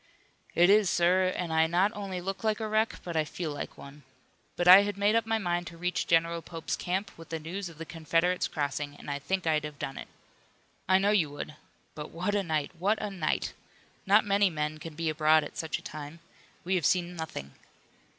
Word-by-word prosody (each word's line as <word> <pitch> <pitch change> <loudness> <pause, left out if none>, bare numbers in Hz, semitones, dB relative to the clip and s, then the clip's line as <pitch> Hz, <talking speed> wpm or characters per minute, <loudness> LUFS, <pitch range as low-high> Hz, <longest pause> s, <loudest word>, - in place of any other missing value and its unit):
"It 175 +3 +6
is, 205 -2 +5
sir, 180 +2 +3
and 170 -3 -3
I 160 0 +4
not 180 +5 +2
only 195 -4 -5
look 195 +2 -4
like 215 0 +1
a 220 - -2
wreck 215 +1 +1
but 170 -2 -5
I 160 - +3
feel 155 +1 -5
like 145 - -6
one. 140 +1 -12 0.5
But 175 - -1
I 185 +2 +11
had 205 -1 -3
made 205 +1 +3
up 230 0 +2
my 225 0 +2
mind 175 -3 -1
to 170 - -9
reach 180 +1 -1
General 165 0 +2
Pope's 165 -1 -4
camp, 190 +3 -2
with 165 - -12
the 165 - -3
news 175 +4 -5
of 165 - -14
the 165 - -6
Confederates 165 +3 0
crossing, 145 -1 -3
and 145 - -7
I 140 - -2
think 190 +5 -2
I'd 155 -2 +2
have 150 -1 -7
done 135 - -5
it." - - -8 0.8
"I 190 - +6
know 200 +2 +2
you 180 -8 +3
would. 145 +1 -7 0.4
But 150 - -7
what 180 +5 -2
a 205 - +2
night! 155 -5 -1
What 205 +4 +1
a 210 - -3
night! 180 -5 -1 0.5
Not 205 +3 +5
many 200 -1 +3
men 155 -1 -3
can 160 -1 -8
be 165 +1 -2
abroad 155 0 +4
at - - -9
such 160 - -2
a - - -14
time. 150 +2 -8 0.4
We 185 - -1
have 175 -5 +1
seen 175 -1 +1
nothing." 155 - -6
175 Hz, 220 wpm, -29 LUFS, 155-195 Hz, 0.8 s, I